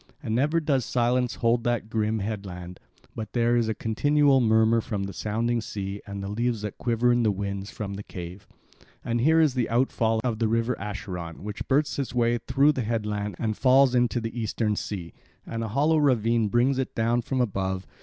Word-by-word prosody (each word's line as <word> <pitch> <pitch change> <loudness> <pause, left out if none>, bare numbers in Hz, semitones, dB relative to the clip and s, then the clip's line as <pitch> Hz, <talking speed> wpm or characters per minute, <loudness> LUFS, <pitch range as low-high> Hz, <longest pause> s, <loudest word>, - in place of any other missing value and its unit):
And 110 -5 -2
never 145 +7 +2
does 140 -5 +1
silence 125 +1 +1
hold 115 0 +1
that 120 -2 -1
grim 110 0 0
headland, 95 -4 -5 0.4
but 110 -2 -6
there 120 0 +2
is 115 -2 +1
a 110 - -1
continual 140 +4 +3
murmur 110 0 +4
from 105 -3 -3
the 100 0 -5
sounding 115 +4 -1
sea 100 -2 -5
and 100 -1 -6
the - - -4
leaves 115 +1 -1
that 105 - -5
quiver 120 +1 +2
in 120 0 +3
the 110 - +3
winds 100 0 -3
from 100 -2 -5
the 100 - -6
cave. 90 0 -9 0.6
And 115 0 0
here 160 +5 +4
is 155 -5 +4
the 125 -2 -1
outfall 115 -2 +1
of 115 -3 -1
the 115 - +2
river 115 +2 +1
Acheron 95 -5 -6
which 105 0 -6
bursts 140 +1 +1
its 135 -2 -3
way 120 0 +2
through 135 +4 +3
the 130 - -2
headland 105 -3 -2
and 110 -2 -1
falls 130 +1 +4
into 120 -1 +2
the 115 0 -5
Eastern 110 -1 -1
sea, 90 -5 -5 0.3
and 115 0 -4
a - - -2
hollow 145 +8 +2
ravine 115 -6 +2
brings 125 +5 +2
it 130 - -3
down 115 +2 +1
from 130 +2 -2
above. 95 -5 -1
115 Hz, 200 wpm, -26 LUFS, 105-125 Hz, 0.6 s, murmur